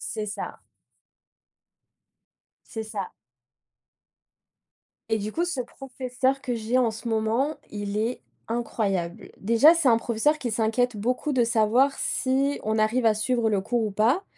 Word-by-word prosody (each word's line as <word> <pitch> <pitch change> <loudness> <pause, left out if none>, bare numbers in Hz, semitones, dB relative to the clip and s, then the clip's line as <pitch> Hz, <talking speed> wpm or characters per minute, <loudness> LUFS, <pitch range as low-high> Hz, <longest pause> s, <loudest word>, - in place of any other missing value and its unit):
C'est 215 -1 -3
ça. 205 - -6 2.1
C'est 225 - -5
ça. 210 -4 -5 2.0
Et 220 - +2
du 210 +1 -4
coup 340 - 0
ce 340 -7 -3
professeur 260 +1 -3
que 250 -4 -2
j'ai 230 +3 0
en 245 -3 +3
ce 225 +2 -8
moment, 225 +7 0
il 205 0 -4
est 230 +4 -1 0.3
incroyable. 200 -7 -2
Déjà 230 - +6
c'est 335 -5 +1
un 230 - +5
professeur 235 +7 +1
qui 245 - -2
s'inquiète 225 +2 +1
beaucoup 250 +7 -1
de 245 -2 +3
savoir 235 +4 +3
si 275 +2 0
on 220 +1 0
arrive 230 +3 +2
à 220 - +5
suivre 230 +1 0
le 205 -2 +2
cours 235 +3 0
ou 210 - -3
pas, 235 - +2
235 Hz, 145 wpm, -25 LUFS, 215-255 Hz, 2.1 s, Déjà